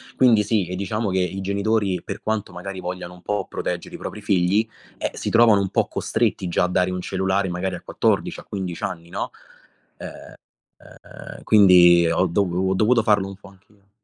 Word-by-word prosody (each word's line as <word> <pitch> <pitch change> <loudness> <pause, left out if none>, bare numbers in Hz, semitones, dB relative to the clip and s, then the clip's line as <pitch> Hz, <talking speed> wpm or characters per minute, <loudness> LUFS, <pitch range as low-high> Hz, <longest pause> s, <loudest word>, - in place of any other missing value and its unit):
Quindi 115 -5 +4
sì, 105 -4 0
e 90 - -4
diciamo 105 +3 -2
che 95 0 0
i 90 +2 -2
genitori, 100 -1 0
per - - -6
quanto 110 -4 -3
magari 95 +2 -7
vogliano 90 -1 -6
un 90 - -17
po' 105 0 -2
proteggere - - -4
i - - -6
propri 105 - -7
figli, 100 +1 +2 0.3
eh, - - -3
si - - -4
trovano 115 -3 +5
un 100 - 0
po' - - +1
costretti 90 - -1
già 85 - +1
a 90 - +2
dare 90 0 +1
un 90 0 -3
cellulare, 95 0 -1
magari 90 +2 -3
a - - -9
14 - - -1
a - - -13
15 95 -4 -5
anni, 85 -1 -7
no. 100 +3 -4 1.5
Ehm, - - -13
quindi 90 -4 +6
ho 95 - +2
dovu 95 +1 0
ho 95 - +1
dovuto 115 +4 +3
farlo 105 -3 +2
un 95 - -9
po' 100 +1 -15
anch'io. 100 +1 -24
95 Hz, 190 wpm, -22 LUFS, 90-105 Hz, 1.5 s, quindi